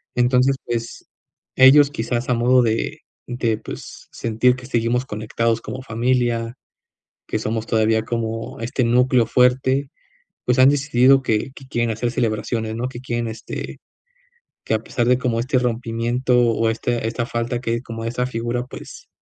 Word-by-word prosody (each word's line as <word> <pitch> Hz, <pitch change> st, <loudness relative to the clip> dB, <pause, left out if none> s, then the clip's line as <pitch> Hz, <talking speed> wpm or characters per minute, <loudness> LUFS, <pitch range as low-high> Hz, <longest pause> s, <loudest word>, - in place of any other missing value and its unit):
Entonces, 125 Hz, +2 st, +3 dB
pues, 115 Hz, -1 st, -5 dB, 0.5 s
ellos 140 Hz, +2 st, +7 dB
quizás, 120 Hz, 0 st, -3 dB
a -, -, +3 dB
modo 125 Hz, +2 st, +4 dB
de 115 Hz, -2 st, -1 dB, 0.3 s
de 120 Hz, -3 st, -1 dB
pues, -, -, -10 dB
sentir 115 Hz, +2 st, +1 dB
que 125 Hz, -, -11 dB
seguimos 120 Hz, 0 st, 0 dB
conectados 115 Hz, +1 st, -1 dB
como 125 Hz, +5 st, -6 dB
familia, 120 Hz, -1 st, 0 dB, 0.7 s
que -, -, -1 dB
somos 110 Hz, +1 st, -3 dB
todavía 110 Hz, 0 st, +2 dB
como 115 Hz, 0 st, -4 dB
este 120 Hz, +3 st, -2 dB
núcleo 125 Hz, +1 st, +3 dB
fuerte, 130 Hz, +3 st, +2 dB, 0.6 s
pues 125 Hz, +1 st, +2 dB
han 130 Hz, +1 st, +8 dB
decidido 135 Hz, -2 st, +4 dB
que 115 Hz, 0 st, -1 dB
que 135 Hz, -, -13 dB
quieren 120 Hz, -2 st, -1 dB
hacer 115 Hz, +2 st, -2 dB
celebraciones, 110 Hz, -1 st, -2 dB
¿no?, 120 Hz, +2 st, -2 dB
que 125 Hz, -2 st, -8 dB
quieren, 120 Hz, -2 st, -2 dB
este, 110 Hz, 0 st, -7 dB, 0.9 s
que -, -, 0 dB
a 110 Hz, -, 0 dB
pesar 120 Hz, +1 st, -2 dB
de 125 Hz, +1 st, +4 dB
como 120 Hz, -2 st, -1 dB
este 130 Hz, +2 st, +1 dB
rompimiento, 120 Hz, +1 st, 0 dB
o 115 Hz, -1 st, +2 dB
este 115 Hz, +1 st, -1 dB
esta 115 Hz, +1 st, -2 dB
falta 120 Hz, 0 st, -3 dB
que 115 Hz, -1 st, -1 dB
como 115 Hz, -2 st, -7 dB
esa 120 Hz, +2 st, -1 dB
figura, 120 Hz, 0 st, -3 dB
pues, -, -, -11 dB
120 Hz, 155 wpm, -21 LUFS, 115-125 Hz, 0.9 s, han